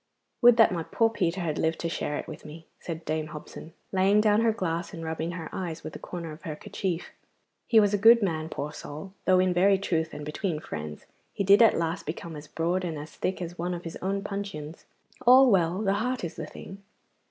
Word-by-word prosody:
'Would 240 -1 +7
that 225 -4 +6
my 175 -2 -1
poor 225 +7 +1
Peter 185 -4 -1
had 160 -3 -2
lived 160 0 +1
to 170 - -1
share 150 -3 -2
it - - -6
with - - -9
me,' 160 +2 -11
said 165 -1 -6
Dame 155 0 -2
Hobson, 155 +1 -10 0.2
laying 195 +2 +4
down 210 0 +4
her 230 -1 +4
glass, 180 -4 -3
and 165 - -7
rubbing 160 +1 -3
her 165 -3 -6
eyes 170 -4 -4
with - - -7
a - - -7
corner 170 -3 -6
of 155 - -11
her 155 -4 -5
kerchief. 175 +2 -4 0.6
'He 225 - +6
was 205 -1 +3
a 205 - +2
good 230 +2 +7
man, 160 -4 -1
poor 150 -1 -5
soul, 155 +6 -8
though 185 -1 +5
in 185 0 +3
very 195 +2 +4
truth 165 -4 -1
and 150 - -7
between 155 +1 -2
friends 75 - -7 0.3
he - - -1
did 200 +3 +6
at 225 - +6
last 165 0 -2
become 160 +1 -5
as 150 0 -9
broad 175 +4 -1
and 165 -3 -3
as 150 +1 -8
thick 185 -1 -3
as 175 0 -8
one 175 +1 -1
of 175 - -7
his 165 - -7
own 195 +1 -2
puncheons. 195 -7 -6 0.4
All 255 0 +8
well, 180 +1 +2
the 195 -1 +2
heart 245 +4 -1
is 170 - -3
the 155 - -6
thing! 195 +5 -10
175 Hz, 230 wpm, -27 LUFS, 160-200 Hz, 0.6 s, All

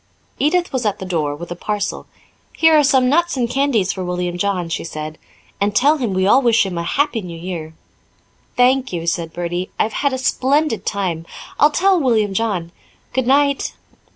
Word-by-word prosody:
Edith 345 +3 +1
was 255 -2 -1
at 210 -3 0
the 190 - -7
door 155 -5 -1
with 175 +3 -9
a - - -3
parcel. 205 +3 -3 0.5
"Here 320 0 +5
are 300 - +5
some 265 -2 +3
nuts 340 +3 +2
and 245 -2 +1
candies 240 -7 +1
for 190 - -5
William 180 0 -2
John," 180 -1 -1
she 165 - -3
said. 155 -1 -7 0.4
"And 205 0 +1
tell 290 +6 +4
him 230 -9 -2
we 190 0 +2
all 235 +7 +5
wish 230 -4 +3
him 190 -2 -4
a - - -2
'Happy 275 - 0
New 175 -3 -8
Year.'" 165 -2 -6 0.8
"Thank 260 +1 +3
you," 170 -2 -4
said 165 -1 -1
Bertie. 175 +2 -3
"I've 215 - 0
had 280 - +2
a 260 - -2
splendid 265 0 0
time. 175 -5 -2 0.3
I'll 295 - +6
tell 375 +4 +3
William 220 -8 +1
John. 195 -6 -1 0.4
Goodnight." 275 +2 +2
210 Hz, 185 wpm, -19 LUFS, 175-270 Hz, 0.8 s, I'll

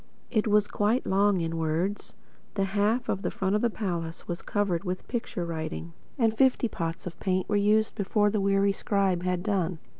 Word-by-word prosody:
It 220 -2 +1
was 210 -1 +4
quite 215 +5 +1
long 195 -1 +3
in 165 0 -2
words. 165 +6 -2 0.4
The 195 - +1
half 210 +5 +1
of 195 - -1
the - - -1 0.4
palace 170 -7 -3
front - - -28
was 175 +1 -4
covered 200 -5 0
with 185 -1 -4
picture 225 -7 -3
writing, 165 0 -5 0.2
and 225 -4 +2
fifty 255 0 +3
pots 165 -5 -4
of 175 -1 -7
paint 185 -1 0
were 205 - 0
used, 210 +2 +3
before 205 0 +1
the 210 -1 0
weary 195 0 +3
scribe 195 -3 0
had 180 -1 -1
done. 185 -5 0
195 Hz, 180 wpm, -28 LUFS, 175-210 Hz, 0.4 s, was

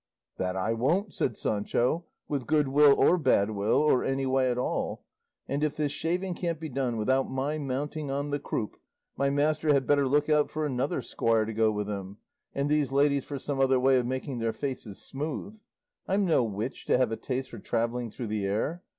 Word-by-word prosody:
"That 90 0 -1
I 105 +4 0
won't," 170 - 0
said - - -1
Sancho, 120 +10 0 0.2
"with 140 -4 -3
good 150 -2 +3
will 145 0 +6
or 180 - +4
bad 105 -8 +3
will, 105 +1 +1
or 150 -4 +3
any 135 0 0
way 130 -1 +2
at 125 - -1
all; 125 - -2 0.4
and 140 +2 -1
if 150 -1 0
this 150 -2 0
shaving 180 +5 -1
can't 170 -2 -3
be 160 -1 -5
done 125 -3 -1
without 130 +5 +1
my 140 +4 -2
mounting 145 +2 -3
on 140 +1 -2
the 145 - 0
croup, 110 -6 -4 0.4
my 140 - +1
master 150 +2 +2
had 135 -2 +2
better 145 0 +3
look 145 +2 +2
out 150 -1 +3
for 155 0 -2
another 130 -1 -1
squire 115 -1 +1
to 110 - -5
go 110 0 +3
with 105 -1 -3
him, 100 -1 -5 0.4
and 140 +1 0
these 145 -3 +1
ladies 140 0 +2
for 145 - -5
some 135 0 -3
other 130 -1 +4
way 130 0 +4
of 120 - -2
making 130 0 -3
their 115 -1 -1
faces 125 -6 -5
smooth; 155 +9 -5 0.5
I'm 195 +1 +2
no 160 -8 +3
witch 110 +4 -5
to - - +4
have 125 -3 +2
a - - 0
taste 130 +2 -4
for 115 - -8
travelling 120 +2 -1
through 120 +3 -6
the 105 -2 -1
air. 130 - -1
135 Hz, 210 wpm, -28 LUFS, 115-150 Hz, 0.5 s, will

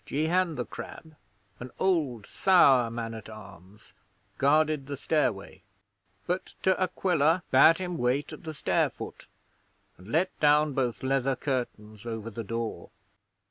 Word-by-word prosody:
Jehan 165 +3 0
the 125 - -3
Crab, 160 -1 -10 0.4
an 125 - -7
old 150 - 0
sour 135 -11 +4
man 115 0 -5
at 110 -2 -9
arms, 100 -1 -14 0.5
guarded 150 0 +2
the 140 -1 -5
stairway, 115 -12 -1 0.6
but 180 +2 -3
De 190 0 +4
Aquila 175 -2 +1
bade 160 +5 +7
him 180 -2 -4
wait 125 +4 0
at - - -10
the 160 -2 -7
stair - - +1
foot, - - -10 0.7
and 90 - -14
let 165 +10 0
down 150 0 +4
both 125 -3 -2
leather 135 0 +1
curtains 120 -5 -4
over 115 -1 -5
the 115 +1 -6
door. 115 +1 -5
135 Hz, 140 wpm, -28 LUFS, 115-160 Hz, 0.7 s, bade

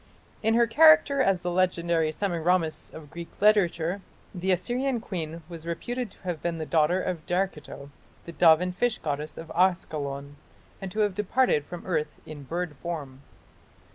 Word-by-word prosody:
In 225 +1 +2
her 235 0 +5
character 290 +1 +6
as 195 -7 +2
the 175 - -1
legendary 170 -3 +1
Semiramis 170 -2 0
of 150 -2 -11
Greek 170 0 -9
literature, 190 -3 +3 0.3
the 185 0 -1
Assyrian 240 +8 0
queen 165 -6 -5
was 170 -1 -9
reputed 240 +8 -3
to - - -21
have 175 -5 -4
been 170 -1 -2
the 160 - -4
daughter 165 +3 +2
of 180 -4 -3
Derceto, 175 -6 -3 0.3
the 170 - -7
dove 165 -1 +5
and 180 0 -2
fish 245 +2 +1
goddess 150 0 -4
of 165 - -8
Askalon, 145 -6 -1 0.4
and 190 -1 -5
to 215 - -1
have 205 -2 +2
departed 210 - +1
from 175 +3 -9
earth 155 -4 -2
in 155 -2 -9
bird 165 +2 -4
form. 140 -5 -6
175 Hz, 165 wpm, -27 LUFS, 160-195 Hz, 0.4 s, character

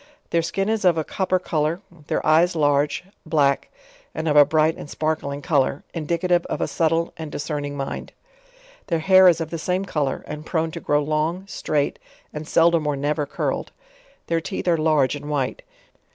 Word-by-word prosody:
Their 170 - +3
skin 195 +4 -2
is 220 -1 0
of 175 -3 +4
a 160 - +1
copper 185 +3 0
color, 160 -1 -1 0.3
their - - -1
eyes 170 +3 +4
large, 145 -1 +2 0.2
black, 145 -4 +1 0.5
and 160 - -3
of 150 - +2
a 145 -1 +8
bright 155 +2 +2
and - - -9
sparkling 150 -3 -2
color, 140 -2 +1
indicative 170 +2 0
of - - -3
a - - 0
subtle 165 0 0
and 160 -2 -6
discern 145 0 -3
ing 145 0 -5
mind. 135 -1 -5 0.8
Their 170 - +1
hair 185 +3 +6
is 170 -2 +5
of 160 -1 -4
the 165 - -3
same 185 +4 -1
color, 150 -7 -2
and 150 0 -7
prone 160 0 -1
to - - -6
grow 145 0 +1
long, 155 +5 -1
straight, 150 -7 -1 0.3
and 150 0 -6
seldom 165 -2 +3
or 145 - +1
never 145 +1 -1
curled; - - -3 0.5
their 165 0 0
teeth 185 +2 -5
are 175 - +4
large 155 -4 +2
and 145 +1 -7
white. 150 - -1
155 Hz, 185 wpm, -23 LUFS, 150-170 Hz, 0.8 s, a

